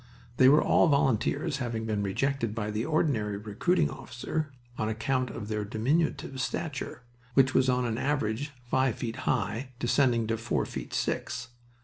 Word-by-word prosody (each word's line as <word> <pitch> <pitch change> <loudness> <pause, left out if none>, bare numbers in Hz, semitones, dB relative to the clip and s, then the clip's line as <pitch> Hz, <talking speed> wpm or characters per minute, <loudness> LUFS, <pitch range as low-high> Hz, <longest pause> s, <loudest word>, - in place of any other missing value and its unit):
They 130 - +7
were 150 +2 +6
all - - +4
volunteers, 140 +2 +2
having 115 -4 -3
been 105 -2 -1
rejected 115 +3 -1
by 105 -2 -2
the 110 +3 -1
ordinary 125 -10 +1
recruiting 110 - +1
officer 140 +5 -4 0.2
on 110 -2 -1
account 125 +3 0
of 105 -3 -6
their 105 -1 -1
diminutive 130 +5 0
stature, 140 -3 -3 0.3
which 130 -1 +5
was 130 - +4
on 125 0 +2
an 115 -1 -1
average 135 -1 0 0.2
five 130 -1 +2
feet 120 -2 -4
high, 125 +2 -1
descending 120 -2 +2
to 115 +1 -1
four 115 +1 -1
feet - - -6
six. 115 - -2
125 Hz, 155 wpm, -29 LUFS, 110-140 Hz, 0.3 s, They